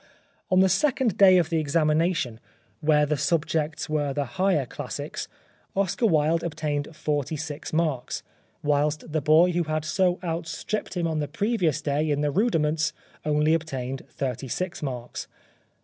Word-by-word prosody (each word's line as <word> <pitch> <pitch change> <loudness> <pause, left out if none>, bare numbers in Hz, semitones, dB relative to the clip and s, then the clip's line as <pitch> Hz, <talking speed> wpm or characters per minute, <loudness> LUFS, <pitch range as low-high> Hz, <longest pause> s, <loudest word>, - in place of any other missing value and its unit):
On 185 0 +5
the 190 - +6
second 250 - +2
day 190 -2 +7
of 175 -1 +1
the 165 - +2
examination, 155 -4 +1 0.4
where 150 -1 +3
the 150 0 0
subjects 155 0 0
were 150 -3 0
the 145 0 -1
Higher 160 +3 +1
Classics, - - -5 0.5
Oscar 195 +4 +1
Wilde 160 -1 +3
obtained 150 -3 -2
46 150 0 -3
marks; 155 -6 -1 0.4
whilst 150 +1 0
the 155 0 0
boy 155 +5 +5
who 175 -1 0
had 155 0 -2
so 180 +3 +2
outstripped 175 +4 -3
him 175 - 0
on 160 -2 0
the 145 - -1
previous 165 - 0
day 150 +1 0
in 145 0 +1
the 150 -1 +1
rudiments 160 -6 +1 0.3
only 150 +1 +2
obtained 135 -5 -3
36 135 +7 -3
marks. 125 -4 -5
155 Hz, 145 wpm, -26 LUFS, 145-170 Hz, 0.5 s, day